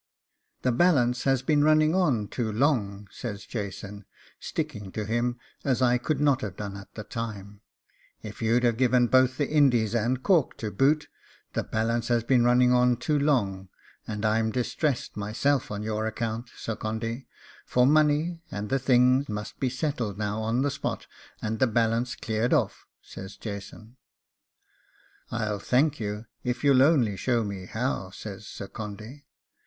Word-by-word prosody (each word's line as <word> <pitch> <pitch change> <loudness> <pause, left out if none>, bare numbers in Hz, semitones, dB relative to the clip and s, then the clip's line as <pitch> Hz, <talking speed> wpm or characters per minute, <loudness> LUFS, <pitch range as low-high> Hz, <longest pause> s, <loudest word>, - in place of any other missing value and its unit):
'The 125 - +3
balance 125 -4 +3
has 135 -1 +2
been 145 +1 +3
running 155 +1 +4
on 140 - +2
too 115 -1 -2
long,' 105 -5 0
says 105 -4 -6
Jason, 100 -1 -6 0.4
sticking 120 -12 -4
to 105 +1 -4
him 120 +2 0 0.3
as 130 -3 +1
I 125 -1 +3
could 140 +3 -1
not 140 -2 +3
have 100 -5 -5
done 100 -1 -6
at 100 -1 -12
the 105 - -6
time, 105 -2 -6 0.6
if - - -8
you'd 115 +2 +2
have 120 -2 +2
given 125 -1 +4
both 130 +1 +3
the 145 - 0
Indies 125 -8 +3
and 120 +3 0
Cork 170 -8 +2
to 110 -2 -4
boot; 150 +7 +2 0.5
'the - - -1
balance 115 +1 -1
has 120 -2 +2
been 120 0 +3
running 125 +1 +4
on 125 -1 +4
too 150 +4 0
long, 100 -10 0 0.4
and 105 0 -3
I'm 110 +1 +2
distressed 125 +3 -1
myself 115 +7 0
on 105 0 -4
your 110 0 -1
account, 115 +1 -3
Sir 115 - -4
Condy, 115 +4 -4 0.4
for 125 0 +2
money, 155 +3 +3
and 105 0 -5
the 135 - +2
thing 125 +1 +4
must 105 0 -5
be 130 - +1
settled 125 - -2
now 105 +1 -2
on 115 +4 0
the 145 - +1
spot, 140 - -4 0.4
and 110 0 -2
the 130 - +4
balance 115 +2 +1
cleared 110 +2 -1
off,' - - -1 0.2
says 95 +1 -10
Jason. 105 +3 -8 1.3
'I'll 110 -3 -2
thank 140 +8 +2
you 105 0 -4 0.2
if 125 +1 -2
you'll 140 -2 +5
only 135 -8 +4
show 120 0 +1
me 100 -3 -6
how,' 110 -5 -2
says 100 +1 -9
Sir 100 - -7
Condy. 110 +8 -8
120 Hz, 165 wpm, -27 LUFS, 105-130 Hz, 1.3 s, you'll